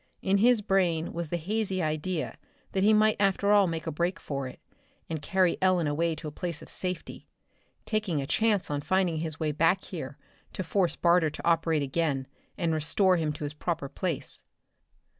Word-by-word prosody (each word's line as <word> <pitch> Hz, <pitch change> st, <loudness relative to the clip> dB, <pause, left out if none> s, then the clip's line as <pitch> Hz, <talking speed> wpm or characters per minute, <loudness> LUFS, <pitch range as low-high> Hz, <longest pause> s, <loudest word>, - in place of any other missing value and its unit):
In 195 Hz, +1 st, +3 dB
his 235 Hz, 0 st, +4 dB
brain 175 Hz, -5 st, +1 dB
was 170 Hz, -2 st, -4 dB
the 175 Hz, -, -1 dB
hazy 195 Hz, +2 st, -1 dB
idea 155 Hz, +1 st, -2 dB, 0.3 s
that 190 Hz, -, 0 dB
he 210 Hz, -, +6 dB
might 215 Hz, 0 st, +4 dB
after 200 Hz, 0 st, +2 dB
all 205 Hz, -2 st, +6 dB
make 165 Hz, -1 st, -3 dB
a 160 Hz, -, -2 dB
break 175 Hz, +4 st, -1 dB
for 140 Hz, -2 st, -4 dB
it, 130 Hz, -, -11 dB, 0.5 s
and 160 Hz, -2 st, -4 dB
carry 185 Hz, +2 st, +2 dB
Ellen 185 Hz, -3 st, +3 dB
away 160 Hz, +3 st, 0 dB
to 155 Hz, +1 st, -7 dB
a -, -, -5 dB
place 170 Hz, 0 st, -5 dB
of -, -, -13 dB
safety, 180 Hz, -1 st, -3 dB, 0.6 s
taking 205 Hz, -8 st, 0 dB
a 135 Hz, -, -2 dB
chance 205 Hz, +3 st, +1 dB
on 145 Hz, 0 st, -1 dB
finding 185 Hz, 0 st, +1 dB
his 160 Hz, -1 st, -4 dB
way 155 Hz, -1 st, 0 dB
back 165 Hz, +5 st, +2 dB
here 145 Hz, -6 st, -7 dB, 0.4 s
to 185 Hz, -, -3 dB
force 180 Hz, 0 st, +1 dB
Barter 170 Hz, -2 st, +3 dB
to 150 Hz, -, -6 dB
operate 165 Hz, -2 st, +2 dB
again 140 Hz, -1 st, -1 dB, 0.3 s
and 165 Hz, -2 st, 0 dB
restore 180 Hz, +4 st, +3 dB
him 155 Hz, -2 st, 0 dB
to 150 Hz, -, -7 dB
his 145 Hz, 0 st, -3 dB
proper 160 Hz, -2 st, -3 dB
place. 170 Hz, +1 st, -3 dB
170 Hz, 190 wpm, -28 LUFS, 155-190 Hz, 0.6 s, he